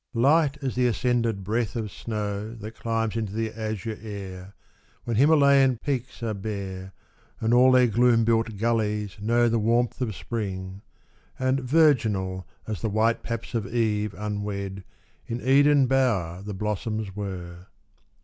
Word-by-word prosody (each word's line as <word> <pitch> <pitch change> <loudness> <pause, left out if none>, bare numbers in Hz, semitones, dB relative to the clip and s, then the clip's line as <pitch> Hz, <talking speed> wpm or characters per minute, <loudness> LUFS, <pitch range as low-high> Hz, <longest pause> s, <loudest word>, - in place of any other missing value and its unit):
LIGHT 140 +4 +3
as 130 - -1
the 125 0 +2
ascended 115 -2 0
breath 110 +2 -1
of 110 -4 -3
snow 105 0 -4
That 110 0 -9
chmbs 115 -1 -2
into 110 -3 -3
the 110 0 -2
azure 110 -1 -4
air, 100 -3 -8 0.5
When 120 - -2
Himalayan 140 -1 +5
peaks 130 -2 -4
are 110 -2 -1
bare, 95 -2 -5 0.5
And 115 +1 +1
all 125 +1 +6
their 130 -1 +6
gloom 115 0 +3
built 115 -2 +1
gullies 105 -3 -1
know 120 +3 +3
The 115 0 +1
warmth 120 +4 +1
of 110 -6 -2
spring, 95 -4 -5 0.3
— - - -35
and 130 +1 +1
virginal 115 - +2 0.2
As 110 -3 -4
the 110 - -1
white 110 +3 +1
paps 115 0 -5
of 110 -4 -1
Eve 105 -3 0
unwed 100 -2 -4 0.4
In 115 - -3
Eden 140 +2 +5
bower 110 -10 +1
the 100 0 -6
blossoms 105 0 -3
were. 90 -3 -6
110 Hz, 150 wpm, -25 LUFS, 100-120 Hz, 0.5 s, all